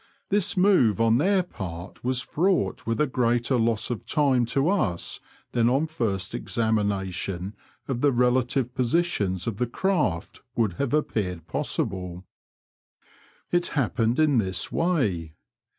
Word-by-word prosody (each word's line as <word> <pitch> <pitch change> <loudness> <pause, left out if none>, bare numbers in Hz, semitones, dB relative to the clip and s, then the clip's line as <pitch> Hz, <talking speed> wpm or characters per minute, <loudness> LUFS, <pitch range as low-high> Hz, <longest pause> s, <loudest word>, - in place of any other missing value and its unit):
This 200 -2 +2
move 180 - +4
on 115 +1 +4
their 190 +3 +3
part 90 - -8
was 125 0 +1
fraught 155 -3 0
with 115 +3 0
a 150 - +4
greater 120 -1 +1
loss 115 0 +1
of 120 - -4
time 135 -6 +2
to 135 +5 +1
us 120 - 0 0.3
than 120 -1 +3
on 135 +4 +2
a - - -2
first 105 - -2
examination 100 -4 -1 0.3
of 125 -3 -2
the 145 - +4
relative 125 0 +1
positions 120 - 0
of 110 -4 -3
the 125 +1 0
craft 150 - -1
would 110 -6 +1
have 140 +1 +1
appeared 90 - -2
possible. 90 +1 -3 1.3
It 175 0 +2
happened 120 -2 +1
in 150 -5 +4
this 95 -4 -2
way. 100 - 0
120 Hz, 135 wpm, -25 LUFS, 100-145 Hz, 1.3 s, move